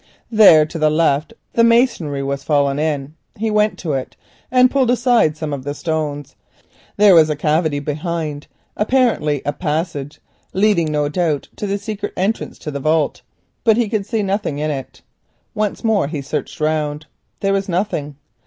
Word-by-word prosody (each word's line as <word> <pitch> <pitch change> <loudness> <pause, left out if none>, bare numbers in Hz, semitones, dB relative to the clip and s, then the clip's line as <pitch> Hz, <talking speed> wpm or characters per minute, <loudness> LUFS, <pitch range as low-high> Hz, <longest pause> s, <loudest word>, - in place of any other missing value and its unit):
There 195 -9 +7
to 165 +2 -7
the 155 0 +3
left 155 +1 +1 0.2
the 230 - +3
masonry 230 - +2
had 140 0 -2
fallen 140 -1 +1
in. 150 -2 -2 0.2
He 220 +1 -2
went 210 0 +2
to 155 -4 -3
it 130 -1 -4 0.3
and 255 0 +4
pulled 265 -3 +2
aside 240 - +3
some 155 -2 -4
of 135 -2 -5
the 145 +1 -4
stones. 145 -3 -3 0.6
There 205 -1 +7
was 160 -2 +6
a 150 - 0
cavity 150 0 +1
behind, 150 0 -4 0.3
apparently 210 - +1
a 145 - -1
passage, 150 -3 -3 0.3
leading 190 -5 +2
no 150 -1 0
doubt 155 -2 -1
to 205 - -4
the 200 +1 -1
secret 205 0 -5
entrance 195 +5 -2
to 150 - -6
the 140 - -4
vault, 155 +1 0 0.4
but 220 -2 +4
he 240 -2 +2
could 205 -3 -2
see 225 -3 -1
nothing 195 -6 -2
in 155 +1 -1
it. 135 -3 -7 0.5
Once 210 +1 -2
more 215 -9 +2
he 145 -2 -5
searched. 140 0 -4
There 155 +5 -3
was 195 0 -1
nothing. 170 -6 -2
160 Hz, 170 wpm, -19 LUFS, 145-205 Hz, 0.6 s, There